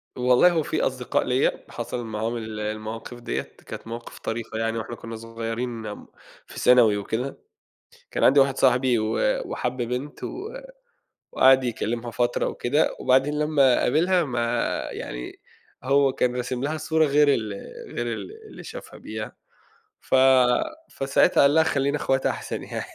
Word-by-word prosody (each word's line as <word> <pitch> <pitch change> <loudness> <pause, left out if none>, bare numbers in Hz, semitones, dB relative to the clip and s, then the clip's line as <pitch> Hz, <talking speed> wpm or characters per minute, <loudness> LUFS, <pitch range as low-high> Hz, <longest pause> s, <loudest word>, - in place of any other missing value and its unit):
والله 125 +7 +5
هو 160 -3 +1
في - - -2
أصدقاء 125 -2 0
ليّا، 125 +1 0
حصَل 120 - -5
معاهم 110 +2 -3
ال 110 -1 -6
المواقف 110 +3 -5
ديّة، 120 - -2 0.2
كانت - - -8
مواقف 115 +1 -8
طريفة 115 -1 -4
يعني 115 0 -1
وإحنا 115 +1 -5
كنا 115 0 -8
صغيّرين، 115 +1 -5
آمم، 105 - -8 0.4
في - - -9
ثانوي 120 -4 +5
وكده، 115 +6 -3 0.7
كان - - -1
عندي 140 +2 +6
واحد 135 -1 +3
صاحبي 125 -2 +3
و 110 0 -1 0.3
وحَب 125 +1 -3
بنت 125 +5 -4
و 405 +4 -5 0.8
وقَعَد 130 0 +5
يكلّمها 120 0 -3
فترة 120 +1 0
وكده، 145 +6 0
وبعدين 135 +3 +2
لمّا 145 -4 +4
قابلها 175 +6 +2
ما 125 -4 -2 0.5
يعني، - - -7 0.4
هو 135 0 +3
كان 125 0 0
راسم 125 +1 -3
لها 155 +2 -1
صورة 160 0 +2
غير 145 +1 +4
ال 110 -5 -2 0.4
غير 120 0 -2
ال 385 - -7 0.2
اللي - - -11
شافها - - -9
بيها، - - -7 0.7
ف - - -3 0.8
فساعتها 135 0 +2
قال 140 +2 +5
لها: 160 - +6
"خلّينا 140 -2 +1
أخوات 135 -2 0
أحسن - - -3
يعني." - - -5
125 Hz, 150 wpm, -24 LUFS, 115-140 Hz, 0.8 s, عندي